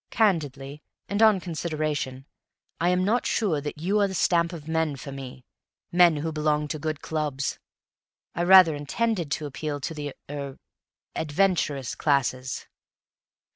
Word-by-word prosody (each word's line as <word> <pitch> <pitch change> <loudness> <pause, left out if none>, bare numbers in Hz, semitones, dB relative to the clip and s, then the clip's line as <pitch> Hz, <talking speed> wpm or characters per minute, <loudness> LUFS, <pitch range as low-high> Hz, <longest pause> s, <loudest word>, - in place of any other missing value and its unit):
Candidly, 150 - 0 0.3
and 205 +2 -1
on 215 -3 +6
consideration, 155 -6 -3 0.5
I 175 - +2
am 180 0 +2
not 230 +5 +1
sure 180 -10 +1
that 150 0 -5
you 195 +6 +1
ARE 200 - +4
the 190 - -5
stamp 170 -1 +2
of 160 -4 -9
men 160 -2 0
for 140 +1 -8
me 130 -2 -9 0.5
men 175 -2 +6
who 155 +2 -2
belong 150 -1 0
to 155 - -3
good 155 0 -3
clubs! 150 -4 -2 0.7
I - - -2
rather 180 -2 +8
intended 170 +4 -1
to 155 - -3
appeal 145 +1 -4
to 165 - -3
the 145 -3 -6
er 140 -2 -6 0.6
adventurous 150 - 0
classes." 130 -3 0
155 Hz, 145 wpm, -26 LUFS, 145-175 Hz, 0.7 s, rather